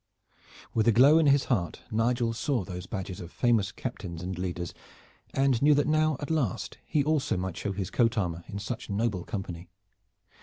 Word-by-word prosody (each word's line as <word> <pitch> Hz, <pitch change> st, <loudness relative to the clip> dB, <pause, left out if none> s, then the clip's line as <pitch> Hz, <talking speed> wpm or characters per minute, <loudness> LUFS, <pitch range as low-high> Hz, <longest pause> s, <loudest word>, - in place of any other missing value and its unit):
With 110 Hz, 0 st, +2 dB
a -, -, +7 dB
glow 140 Hz, +8 st, +7 dB
in 160 Hz, -, +4 dB
his 140 Hz, 0 st, +5 dB
heart 95 Hz, -9 st, -1 dB
Nigel 115 Hz, +1 st, +1 dB
saw 120 Hz, -1 st, 0 dB
those 90 Hz, 0 st, -7 dB
badges 95 Hz, -3 st, -5 dB
of 85 Hz, -1 st, -8 dB
famous 115 Hz, -6 st, +2 dB
captains 85 Hz, -1 st, -6 dB
and 95 Hz, +1 st, -3 dB
leaders 90 Hz, -1 st, -4 dB, 0.6 s
and 135 Hz, -3 st, +2 dB
knew 150 Hz, +1 st, +6 dB
that 145 Hz, -, +2 dB
now 155 Hz, -1 st, +2 dB
at 145 Hz, -, -4 dB
last 140 Hz, -, -1 dB
he 150 Hz, -, +2 dB
also 150 Hz, -8 st, +1 dB
might 95 Hz, -1 st, -3 dB
show 100 Hz, -, -3 dB
his 95 Hz, -2 st, -4 dB
coat 115 Hz, -1 st, +2 dB
armor 85 Hz, -4 st, -1 dB
in 100 Hz, -, -6 dB
such 110 Hz, +4 st, -5 dB
noble 100 Hz, -3 st, 0 dB
company. 90 Hz, -4 st, -6 dB
110 Hz, 185 wpm, -28 LUFS, 95-135 Hz, 0.6 s, a